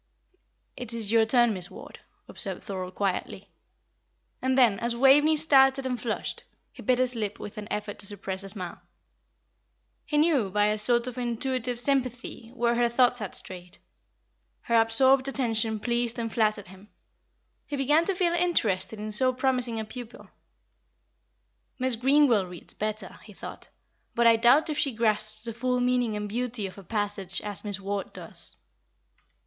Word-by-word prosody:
"It 245 -2 -6
is 220 -3 -1
your 225 -1 +4
turn, 240 -1 +4
Miss 180 -2 -4
Ward," - - -12 0.3
observed 195 -5 -5
Thorold, 185 -2 -6
quietly. 195 -2 -3 0.9
And 260 0 +1
then, 230 -6 +4
as 235 0 -1
Waveney 280 +5 +5
started 270 -3 +4
and 250 -3 -3
flushed, 230 -3 -4 0.3
he - - -12
bit 255 -2 +2
his 255 0 +1
lip 210 -3 -4
with 210 - -8
an 205 - -8
effort 210 -1 -4
to 200 - -1
suppress 195 -1 -5
a 195 - -7
smile. 185 -3 -6 1.2
He 300 - -2
knew, 295 - +3
by 205 +2 +2
a 210 0 0
sort 240 +2 +3
of 255 0 -5
intuitive 245 0 -2
sympathy, 250 -3 -2
where 235 -1 +1
her 240 0 +2
thoughts 245 +1 +3
had 210 -3 -5
strayed. 180 -1 -6 0.8
Her 230 -1 +3
absorbed 260 +4 +3
attention 225 -5 0
pleased 240 +1 -1
and 230 -2 -4
flattered 215 -4 0
him; 190 +2 -15 0.8
he 290 - -4
began 295 +4 +3
to 390 - 0
feel 350 -1 +1
interested 225 - +1
in 215 +1 -5
so 255 +5 +3
promising 255 -3 0
a 220 - -4
pupil. 240 +1 -10 1.5
"Miss 255 -1 0
Greenwell 250 -5 +3
reads 180 -1 -4
better," 215 -2 -5
he 210 - -14
thought; - - -9 0.5
"but 235 - +2
I 230 0 +7
doubt 245 +8 +4
if 300 - -2
she 275 -4 +1
grasps 215 -1 -1
the 230 - -2
full 250 +2 -1
meaning 245 -3 +1
and 210 0 -3
beauty 235 0 -3
of 195 +1 -8
a - - -12
passage 205 -2 -2
as 205 -2 -3
Miss 205 -2 -4
Ward 195 0 -4
does." - - -10
230 Hz, 165 wpm, -27 LUFS, 210-255 Hz, 1.5 s, I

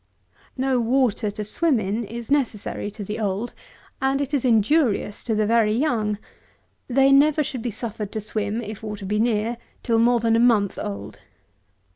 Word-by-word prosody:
No 260 -1 +1
water, 240 -2 +1
to 210 +1 -5
swim 285 +4 +2
in, 210 +3 -2
is 230 +4 -7
necessary 230 -7 -1
to 205 0 -8
the 210 +3 -5
old, 210 +2 -2 0.5
and 270 +1 +1
is 280 - +1
injurious 225 -2 +2
to 225 - 0
the 215 0 +2
very 220 -1 +3
young. 225 -5 0 0.7
They 270 +2 +4
never 300 +2 +5
should 260 -4 -4
be 240 - -2
suffered 215 -2 -5
to 220 - -2
swim 215 +1 -2
(if 215 -1 -7
water 210 -2 -6
be 210 +2 0
near) 225 0 +1 0.3
till 230 -1 +2
more 240 +1 +4
than 225 0 +2
a - - +3
month 225 -5 +3
old. 100 0 -6
225 Hz, 170 wpm, -23 LUFS, 210-250 Hz, 0.7 s, never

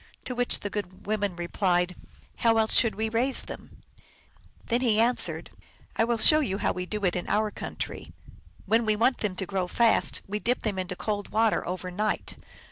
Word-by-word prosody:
To 250 - -4
which 245 0 +1
the 205 - -4
good 185 -3 -6
women 205 -3 -1
replied, 180 0 0 0.2
" - - -29
How 225 -1 +3
else 220 0 +3
should 230 -3 +4
we 220 +1 -1
raise 240 +4 +1
them? - - -11 0.4
" - - -30
Then 240 +1 +1
he 225 -4 +2
answered, 240 +2 +2 0.2
" - - -29
I 225 - +2
will 235 0 0
show 305 +7 +6
you 195 -10 -1
how - - 0
we 180 0 -5
do 210 0 -3
in 175 -1 -1
our 215 0 +1
country. - - -6 0.5
When 225 +2 +2
we 215 -1 +1
want 240 +4 +2
them 205 -4 -2
to 190 - -3
grow 185 -1 -2
fast, 230 +4 +2
we 210 +2 -3
dip 245 +4 -1
them 205 -4 -2
into 185 0 -4
cold 205 +1 -3
water 220 0 +2
over 180 0 -4
night. 210 +4 -2
210 Hz, 205 wpm, -27 LUFS, 185-230 Hz, 0.5 s, show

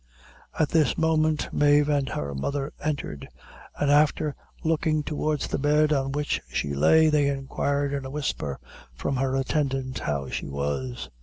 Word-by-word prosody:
At 155 -2 +2
this 160 -3 +2
moment 155 -1 +1
Mave 145 0 +4
and 145 -2 +1
her 70 -1 -3
mother 140 - -3
entered, 140 - -3 0.5
and 145 -1 +2
after 150 0 +3 0.3
looking 155 -1 +1
towards 150 0 -1
the - - -2
bed 150 +2 +3
on 135 -1 0
which 145 +1 -1
she 70 +3 -2
lay, 160 - +5
they 150 -2 +3
inquired 140 +1 -1
in 140 -1 -2
a 130 - -6
whisper, 135 - -3 0.4
from 135 - -2
her 135 0 0
attendant 135 -2 -1
how 70 -2 -2
she - - -4
was. 70 -3 -3
140 Hz, 155 wpm, -26 LUFS, 130-150 Hz, 0.5 s, lay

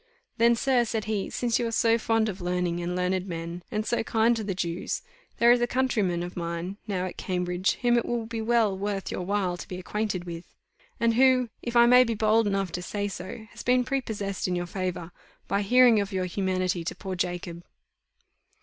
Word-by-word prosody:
"Then, 235 +1 +5
sir," 250 0 +2
said 220 -2 -3
he, 215 -3 -2
"since 240 -2 0
you 240 - 0
are - - -3
so 230 0 +3
fond 225 0 +1
of 195 -3 -5
learning 175 -1 -1
and 175 +1 -3
learned 180 +1 0
men, 170 0 -5
and 215 0 -2
so 235 - 0
kind 225 +1 +2
to 225 - -3
the 195 -2 -3
Jews, 175 - -3 0.3
there 235 0 +6
is 240 0 +4
a 240 - +2
countryman 215 -10 0
of 175 - -7
mine 170 +2 -4
now 185 -3 -1
at 180 - -7
Cambridge, 180 0 0
whom 240 0 +4
it - - -4
will 240 -2 -2
be 225 0 -4
well 225 -3 +2
worth 195 0 -3
your - - -3
while 185 -1 -1
to - - -8
be 180 - -6
acquainted 195 0 -3
with; 170 -1 -9 0.4
and 230 -1 +3
who, 255 0 +4
if 240 0 -5
I 235 0 +7
may 250 +1 +7
be 230 -2 -2
bold 215 +1 +3
enough 195 -3 -1
to 180 - -4
say 205 +2 -3
so, 190 +3 -7
has - - -9
been 250 0 +3
prepossessed 220 -8 -2
in 180 - -1
your 175 0 -2
favour, 180 -2 -4 0.4
by 200 - +1
hearing 245 +1 +5
of 200 +1 -4
your 185 -1 -1
humanity 185 -1 -1
to 165 - -4
poor 190 -2 -6
Jacob." 175 -1 -3
200 Hz, 215 wpm, -27 LUFS, 180-230 Hz, 0.4 s, I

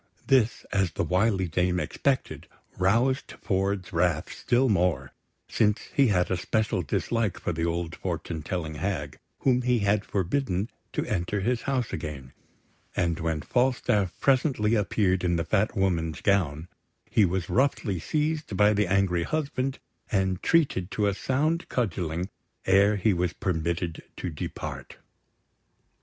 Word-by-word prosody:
This, 125 -4 +2
as 95 -4 +1
the - - -1
wily 95 0 +1
dame 90 +2 +1
expected, 135 +7 -1 0.3
roused 120 +8 +2
Ford's 95 -1 -1
wrath 85 -1 +1
still 125 +2 +2
more, 90 - +1 0.4
since 105 -1 +2
he 140 -2 +4
had 90 -4 +1
a 95 - +1
special 110 +3 0
dislike 115 -4 -1
for - - -2
the 80 +1 -1
old 85 -1 -2
fortune 80 -2 -4
telling 80 0 -3
hag, 75 -3 -3 0.2
whom 125 -2 +3
he 125 0 +2
had 100 0 +2
forbidden 100 +1 -1 0.2
to - - -1
enter 100 +1 -1
his 120 +4 0
house 130 -4 -1
again; 70 -5 -6 0.6
and 85 -2 0
when 80 -2 -1
Falstaff 120 -7 +1
presently 130 -5 +2
appeared 95 -3 +1
in 90 -1 +2
the 85 0 -1
Fat 105 +3 +1
Woman's 85 -4 0
gown, 85 -6 +1 0.4
he 110 - +3
was 90 -2 0
roughly 120 -8 +1
seized 150 - -1
by 105 +2 +5
the 105 -1 +1
angry 95 -2 +2
husband, 135 - -2 0.3
and 95 -4 +1
treated 140 - +2
to 105 0 0
a 100 - +2
sound 155 - 0
cudgelling 90 -6 -1 0.4
ere 100 +2 +5
he 100 +1 +2
was 90 -1 0
permitted 85 -2 -2 0.2
to 90 - -4
depart. 75 - -6
95 Hz, 145 wpm, -27 LUFS, 85-115 Hz, 0.6 s, by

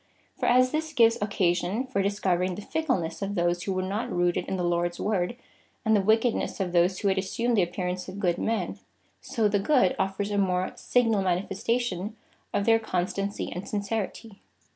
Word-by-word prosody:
For - - -2
as 255 +1 +5
this 315 0 -2
gives 230 -4 +4
occasion 195 +3 0
for 255 -6 -1
discovering 185 -2 0
the 210 - -7
fickleness 190 - -1
of 200 +1 -2
those 175 -1 +1
who 195 - -2
were 185 0 -1
not 195 +4 -3
rooted 175 0 +1
in 190 - -2
the 180 - -1
Lord's 175 0 0
Word, 200 +1 0 0.5
and 220 0 +4
the 205 - +4
wickedness 220 +4 +1
of 185 -2 -1
those 175 +2 +3
who 205 - -1
had 190 0 +2
assumed 230 +5 0
the 205 - +4
appearance 180 +1 -2
of 185 - -8
good 180 -4 0
men, 225 0 -1 0.4
so 225 -2 0
the 205 0 +1
good 245 -3 +3
afford 195 +2 -1
a 205 - +1
more 185 -1 +1
signal 230 -5 +2
manifestation 195 +3 -1 0.3
of 200 - 0
their 225 +1 +5
constancy 195 0 -2
and 180 +2 -6
sincerity." 205 0 -4
195 Hz, 185 wpm, -27 LUFS, 180-225 Hz, 0.5 s, as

